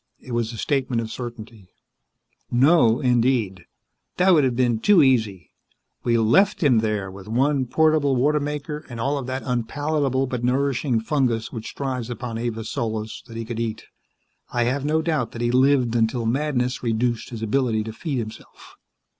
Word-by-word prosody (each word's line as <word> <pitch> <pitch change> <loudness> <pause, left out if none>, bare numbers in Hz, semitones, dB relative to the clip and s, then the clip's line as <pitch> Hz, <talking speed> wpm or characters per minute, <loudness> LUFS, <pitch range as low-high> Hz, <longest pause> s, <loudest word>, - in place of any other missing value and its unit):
It 130 - -11
was 120 -1 -1
a 115 - -8
statement 130 -2 0
of 110 -1 -4
certainty. 115 -5 -8 0.8
"No, 125 -2 +4
indeed. 120 -7 +1 0.5
That 185 +1 +5
would 155 -4 +5
have 130 -2 +1
been 120 -3 +1
too 200 - +5
easy. 110 - +1 0.5
We 120 -1 +2
left 170 - +3
him 125 -6 +4
there 105 -3 -2
with 95 +1 -11
one 130 +3 +1
portable 155 0 +2
water 150 +4 +2
maker 150 +1 -4
and 120 -2 -7
all 140 +5 0
of 130 - -6
that 130 +1 -3
unpalatable 135 +2 0
but 125 -2 -4
nourishing 130 -1 +1
fungus 120 -3 0
which 115 -2 -7
thrives 130 -4 -3
upon 120 -2 -5
Avis 115 -2 -4
Solis 110 -1 -3
that 115 -1 -9
he 115 - -4
could 115 0 -5
eat. 115 -2 -3 0.7
I 120 - +1
have 130 +3 -1
no 155 +2 +1
doubt 150 -8 -1
that 115 - -6
he 120 - +1
lived 130 -2 +3
until 115 +1 +1
madness 125 0 0
reduced 120 0 -1
his 115 -2 -7
ability 110 -1 +1
to 110 0 -7
feed 145 +2 -4
himself." 110 -2 -9
125 Hz, 170 wpm, -23 LUFS, 115-140 Hz, 0.8 s, That